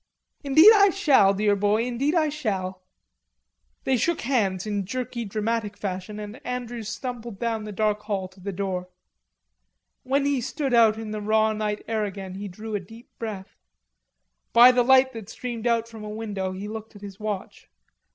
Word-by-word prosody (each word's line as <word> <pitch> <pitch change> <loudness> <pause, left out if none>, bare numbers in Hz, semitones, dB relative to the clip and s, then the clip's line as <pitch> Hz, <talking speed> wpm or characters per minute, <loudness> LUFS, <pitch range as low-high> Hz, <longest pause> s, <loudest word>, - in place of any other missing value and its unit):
"Indeed 315 +9 +8
I 400 0 +6
shall, 295 - +4
dear 205 0 +2
boy, 205 +3 +2
indeed 255 +6 0
I 310 -3 +3
shall." 190 -10 -3 1.0
They 265 - +2
shook 340 +7 0
hands 205 -8 0
in 205 -2 -1
jerky 235 +3 -4
dramatic 215 0 -2
fashion 195 +2 -5
and 210 +3 -8
Andrews 240 -3 -4
stumbled 235 -3 -6
down 225 -1 -2
the 210 - -6
dark 210 0 0
hall 200 -3 -3
to 190 +1 -20
the 200 +2 -5
door. 185 -1 -3 1.1
When 275 +2 0
he 280 -3 +1
stood 275 +2 -2
out 225 -2 +5
in 220 -1 -6
the 215 0 -4
raw 220 +1 +2
night 210 -1 -2
air 220 -1 0
again 195 -2 -5
he 200 +2 -6
drew 215 +4 -8
a 205 - 0
deep 225 +6 -14
breath. 210 -4 -7 0.9
By 240 +2 +9
the 250 0 +3
light 260 +1 +5
that 225 -3 -8
streamed 240 -1 -4
out 230 -1 +1
from 225 -2 -10
a 210 - -6
window 210 -3 -4
he 190 +2 -6
looked 220 0 -8
at 205 - -13
his 200 -1 -9
watch. 210 -3 -5
220 Hz, 180 wpm, -25 LUFS, 205-245 Hz, 1.1 s, By